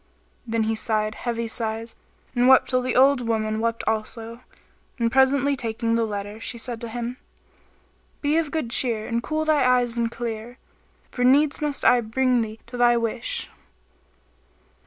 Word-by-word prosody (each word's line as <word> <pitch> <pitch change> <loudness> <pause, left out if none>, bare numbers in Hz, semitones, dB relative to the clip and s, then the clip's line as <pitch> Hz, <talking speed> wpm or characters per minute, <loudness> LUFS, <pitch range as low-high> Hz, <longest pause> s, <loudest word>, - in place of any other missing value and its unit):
Then 225 0 0
he 220 +1 0
sighed 215 -1 -1
heavy 235 0 -3
sighs 225 0 -4 0.4
and 245 +1 +3
wept 265 0 +5
till 255 0 +2
the 250 0 -2
old 270 0 +5
woman 220 -2 -1
wept 230 0 -1
also 225 +1 -3 0.6
and 230 -2 0
presently 275 +2 +3
taking 230 -2 -2
the 230 -1 +1
letter 205 0 -5
she 235 - -4
said 235 -1 -4
to 235 - -4
him, 240 +2 -5 1.0
"Be 290 +1 +1
of 325 -3 0
good 295 -7 -3
cheer 230 -4 +2
and 235 0 -1
cool 310 +4 -2
eyes 250 -4 +2
and 230 -1 +1
clear; 235 0 -6 0.5
for 245 - -2
needs 280 +4 +4
must 295 -2 -2
I 245 -1 +6
bring 250 +2 +1
thee 220 0 -5
to 245 - -8
thy 240 0 +4
wish." 230 0 -2
235 Hz, 160 wpm, -24 LUFS, 225-255 Hz, 1.0 s, I